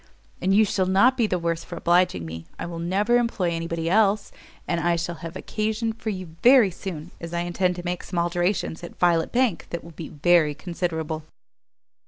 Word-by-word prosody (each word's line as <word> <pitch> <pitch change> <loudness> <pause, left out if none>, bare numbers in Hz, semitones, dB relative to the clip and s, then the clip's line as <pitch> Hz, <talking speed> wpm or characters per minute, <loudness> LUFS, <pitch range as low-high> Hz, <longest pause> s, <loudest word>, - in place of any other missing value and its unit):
And 185 - +1
you 215 +2 +5
shall 190 -2 0
not 200 +8 +5
be 235 -4 +2
the 185 - 0
worse 170 -1 -2
for - - -8
obliging 175 - +2
me; 80 +1 -8
I - - -4
will 170 -1 -6
never 200 +8 +2
employ 225 -7 0
any 165 0 -3
body 165 -1 -3
else, 205 +2 +2 0.4
and 170 - 0
I 170 0 +2
shall 170 0 -3
have 165 +1 -7
occasion 220 +3 -2
for 220 0 -5
you 185 -5 -6
very 245 -6 +7
soon, 175 -3 -7
as 170 0 -5
I 170 - 0
intend 180 +1 0
to 175 0 -7
make 175 0 -2
some 180 - -6
alterations 175 0 0
at 175 - -9
Violet 170 -2 +2
Bank 245 -7 +1
that 170 - -5
will 170 - -11
be 160 0 -8
very 155 -1 +3
considerable." 160 -3 -3
175 Hz, 205 wpm, -24 LUFS, 165-195 Hz, 0.4 s, very